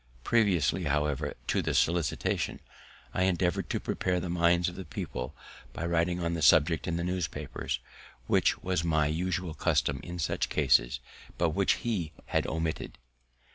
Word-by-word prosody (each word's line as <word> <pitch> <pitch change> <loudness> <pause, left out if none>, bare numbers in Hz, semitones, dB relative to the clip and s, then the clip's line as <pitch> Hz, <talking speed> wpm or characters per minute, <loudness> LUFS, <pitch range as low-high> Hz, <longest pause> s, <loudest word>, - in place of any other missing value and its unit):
Previously, 95 -6 +2
however, 75 0 0
to - - +1
the - - -1
solicitation, 85 -2 +1 0.5
I 95 - +2
endeavoured 90 -2 0
to - - 0
prepare 90 -1 -1
the 90 -1 -4
minds 85 0 +3
of 90 - -3
the 95 - -7
people 65 -7 -5 0.4
by 85 - -4
writing 85 +1 +1
on 85 0 0
the 85 - -2
subject 80 +2 +4
in 85 -1 0
the 85 - -2
newspapers, 90 -1 -3 0.5
which - - +2
was 90 -3 0
my 80 -3 +2
usual 90 +2 -1
custom 70 -3 +1
in 85 +4 -7
such 85 - -1
cases, 65 -4 +3 0.4
but 85 -1 +2
which 100 +4 +3
he 90 -10 -2
had - - 0
omitted. 80 0 -3
85 Hz, 155 wpm, -29 LUFS, 75-90 Hz, 0.5 s, subject